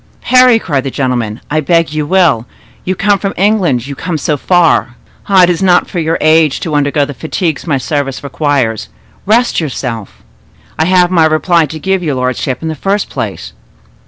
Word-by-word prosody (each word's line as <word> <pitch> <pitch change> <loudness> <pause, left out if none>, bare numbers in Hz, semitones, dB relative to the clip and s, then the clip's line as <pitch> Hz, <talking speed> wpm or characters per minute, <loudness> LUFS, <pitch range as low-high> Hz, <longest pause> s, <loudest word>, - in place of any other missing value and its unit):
"Parry," 255 -2 +4
cried 145 -11 -2
the 135 - -3
gentleman, 125 -5 -2
"I 155 - +1
beg 165 +1 +1
you 155 -1 -2
will; 165 -10 +2 0.4
you 185 - -2
come 200 +1 +1
from 195 0 -3
England—you 175 - +1
come 165 +4 -4
so 150 0 -1
far. 165 -5 +2 0.3
Ah! 190 -2 +5
it 175 - +4
is 175 - -3
not 180 -2 +3
for 175 - -4
your 165 0 0
age 155 -2 +3
to 160 - -4
undergo 145 0 +1
the 145 - -7
fatigues 160 +3 -3
my 145 -4 +1
service 135 0 -3
requires. 140 -6 -1 0.4
Rest 235 +4 +2
yourself." 125 -8 -5 0.6
"I 160 - +2
have 180 0 +3
my 165 -3 +4
reply 160 +1 +2
to 160 - -7
give 190 +4 -1
your 150 -5 -2
lordship, 130 +2 -2
in - - -3
the 160 - -2
first 195 +7 -2
place." - - -5
155 Hz, 185 wpm, -12 LUFS, 140-180 Hz, 0.6 s, Ah